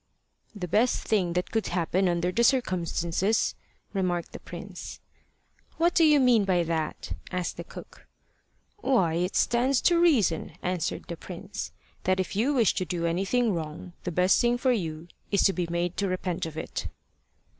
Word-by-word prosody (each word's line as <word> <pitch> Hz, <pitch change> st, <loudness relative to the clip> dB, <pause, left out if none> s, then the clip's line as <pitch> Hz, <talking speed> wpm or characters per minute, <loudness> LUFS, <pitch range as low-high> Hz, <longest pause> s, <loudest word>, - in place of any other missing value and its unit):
"The 185 Hz, -3 st, -4 dB
best 220 Hz, +8 st, +2 dB
thing 185 Hz, -6 st, +1 dB
that 180 Hz, +1 st, -2 dB
could 225 Hz, -1 st, 0 dB
happen 180 Hz, +2 st, +1 dB
under 175 Hz, +1 st, 0 dB
the 235 Hz, +6 st, +1 dB
circumstances," 185 Hz, -, +1 dB, 0.4 s
remarked 180 Hz, -3 st, -1 dB
the -, -, -8 dB
prince. -, -, -8 dB, 0.8 s
"What 340 Hz, +1 st, +3 dB
do 335 Hz, -, +4 dB
you 300 Hz, -2 st, +6 dB
mean 245 Hz, -5 st, +5 dB
by 185 Hz, -3 st, +2 dB
that?" 160 Hz, -2 st, -3 dB, 0.2 s
asked 180 Hz, -2 st, -2 dB
the -, -, -5 dB
cook. -, -, -12 dB, 0.7 s
"Why, 245 Hz, -, +2 dB
it 180 Hz, +3 st, -1 dB
stands 245 Hz, +2 st, +3 dB
to 345 Hz, -1 st, +4 dB
reason," 235 Hz, -, +3 dB
answered 180 Hz, -2 st, -2 dB
the -, -, -5 dB
prince -, -, -7 dB, 0.3 s
"that 185 Hz, 0 st, +2 dB
if 185 Hz, -, -2 dB
you 235 Hz, +8 st, +2 dB
wish 230 Hz, -6 st, +4 dB
to -, -, -1 dB
do 170 Hz, -2 st, -2 dB
anything 195 Hz, +7 st, +1 dB
wrong, 165 Hz, +1 st, -5 dB
the 180 Hz, -, -3 dB
best 180 Hz, +2 st, +3 dB
thing 240 Hz, 0 st, +2 dB
for 260 Hz, +1 st, +2 dB
you 165 Hz, -7 st, -2 dB, 0.2 s
is 200 Hz, -, +3 dB
to 195 Hz, -, +4 dB
be 180 Hz, -2 st, -2 dB
made 170 Hz, +1 st, -1 dB
to 200 Hz, -, 0 dB
repent 185 Hz, -2 st, -2 dB
of 160 Hz, -1 st, -9 dB
it." -, -, -4 dB
185 Hz, 170 wpm, -27 LUFS, 170-235 Hz, 0.8 s, you